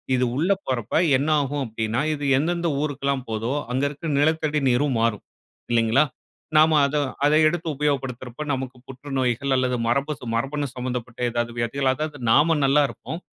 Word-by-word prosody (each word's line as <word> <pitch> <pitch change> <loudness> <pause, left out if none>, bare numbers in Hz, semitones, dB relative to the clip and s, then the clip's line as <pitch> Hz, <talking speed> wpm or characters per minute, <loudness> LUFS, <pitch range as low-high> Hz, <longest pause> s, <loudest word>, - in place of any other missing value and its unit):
இது 125 0 +2
உள்ள 165 +8 +1
போறப்ப, 120 -3 -3 0.2
என்ன 140 +3 -2
ஆகும்? 140 0 -2
அப்பிடின்னா, 115 +1 -2
இது 145 -1 -5
எந்த 155 +5 +1
எந்த 170 - -1
ஊருக்குலாம் 140 -3 -2
போதோ, 110 +2 -2 0.2
அங்க 130 +2 0
இருக்கிற 145 +3 -6
நிலத்தடி 155 0 +1
நீரும் 130 +1 +1
மாறும். 115 -3 0 0.5
இல்லேங்களா! 115 +4 +4 0.5
நாம 155 0 +6
அத 140 +2 -2 0.3
அதை 150 +1 +4
எடுத்து 170 +1 -2
உபயோகப்படுத்துறப்ப, 135 -2 -2
நமக்கு 130 -1 -4
புற்றுநோய்கள், 135 0 -1
அல்லது 125 -1 0
மரபு 140 +5 +1
ச 120 - -7
மரபணு 140 +4 -2
சம்மந்தப்பட்ட 125 -1 -5
ஏதாவது 120 0 -1
வியாதிகள் 130 +3 0
அதாவது 150 +1 -5
நாம 155 +5 +4
நல்லா 145 +2 +4
இருப்போம். 165 - -7
135 Hz, 155 wpm, -23 LUFS, 125-150 Hz, 0.5 s, நாம